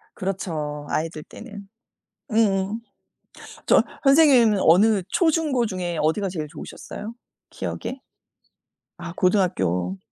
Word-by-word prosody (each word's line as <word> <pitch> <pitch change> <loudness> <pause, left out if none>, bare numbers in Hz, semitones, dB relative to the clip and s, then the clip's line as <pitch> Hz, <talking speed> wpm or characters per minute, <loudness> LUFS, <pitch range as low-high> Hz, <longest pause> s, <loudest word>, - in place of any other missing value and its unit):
그렇죠, 155 -6 -4
아이들 155 -1 -2
때는. 200 -1 -11 0.6
음음. 210 -1 +1 0.9
저 - - +5 0.2
선생님은 275 -8 +5
어느 195 +4 +4
초중고 310 -7 +1
중에 180 -5 -3
어디가 185 +6 0
제일 155 -4 -4
좋으셨어요, 215 +8 -8 0.4
기억에? 265 - -5 1.0
아 170 - -7
고등학교. 95 - +1
195 Hz, 235 characters per minute, -23 LUFS, 160-225 Hz, 1.0 s, 저